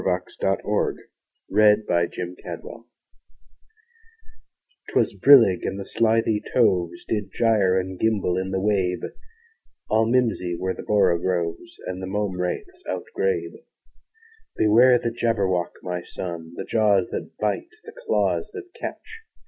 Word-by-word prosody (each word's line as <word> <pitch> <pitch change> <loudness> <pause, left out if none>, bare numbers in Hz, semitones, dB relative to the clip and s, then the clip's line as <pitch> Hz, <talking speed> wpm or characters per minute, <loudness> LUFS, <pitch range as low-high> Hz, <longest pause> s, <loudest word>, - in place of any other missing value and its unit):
Lewis 90 -1 -2
Carroll 95 +2 0 0.6
Jabberwocky 90 -4 0 2.0
'TWAS - - +1
brillig, 115 -10 +6
and 95 - -3
the 100 - -6
slithy 110 -1 +1
toves 90 -8 +1
Did 105 -3 -3
gyre 105 -5 +2
and 95 0 -6
gimble 105 -5 +1
in 95 +1 -2
the 95 0 -1
wabe: 95 -3 0 0.8
All 110 +1 +3
mimsy 110 -8 +1
were 95 0 -1
the - - -8
borogoves, 90 -4 0
And 95 0 -5
the 95 - -5
mome 95 -2 -2
raths 360 - -4
outgrabe. 470 0 -3 0.9
"Beware 120 +4 +6
the 115 -1 -2
Jabberwock, 100 -7 0
my 90 -1 -3
son! 85 -2 -7
The - - -5
jaws 105 -4 +2
that - - -6
bite, 105 - -1
the - - -11
claws - - 0
that 375 -3 -9
catch! 450 - -8
100 Hz, 120 wpm, -24 LUFS, 90-115 Hz, 2.0 s, brillig